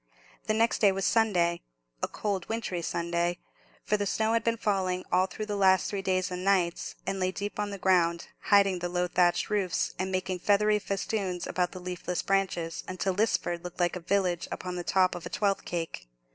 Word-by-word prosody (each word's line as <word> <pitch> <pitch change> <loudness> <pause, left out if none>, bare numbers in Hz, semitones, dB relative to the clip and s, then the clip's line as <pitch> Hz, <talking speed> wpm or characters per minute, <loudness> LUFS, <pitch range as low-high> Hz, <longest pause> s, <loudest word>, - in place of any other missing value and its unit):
The 215 - +2
next 230 +1 +2
day 205 -2 +5
was 195 0 -2
Sunday—a 170 - 0
cold 200 -4 -3
wintry 220 -6 -2
Sunday; 170 +1 -1 0.5
for 210 - +1
the 205 -1 -1
snow 220 +3 +1
had 230 - +2
been 230 0 +1
falling 185 -4 0
all 185 +1 +3
through 215 +4 -5
the 210 -1 -3
last 190 -1 +4
three 200 -1 -2
days 185 -1 0
and 180 0 -4
nights, 185 -3 +1
and 195 - -2
lay 185 0 +1
deep 205 +2 -5
on 205 0 -1
the 200 - -5
ground, 170 -3 +2 0.2
hiding 195 -2 +4
the 175 0 -3
low 180 0 0
thatched 175 +3 +2
roofs, 190 -4 0
and 190 0 -1
making 185 -1 -2
feathery 210 +2 +3
festoons 195 -3 -2
about 180 -1 -1
the 185 - -7
leafless 180 0 -3
branches, 185 -4 -1
until 185 +1 -1
Lisford 180 -4 0
looked 180 0 -8
like 175 0 +1
a - - -3
village 180 -1 0
upon 180 -1 -4
the 175 - -3
top 185 +1 +3
of 175 - -6
a - - -9
twelfth 200 -2 0
cake. 165 - -4
185 Hz, 200 wpm, -29 LUFS, 175-200 Hz, 0.5 s, day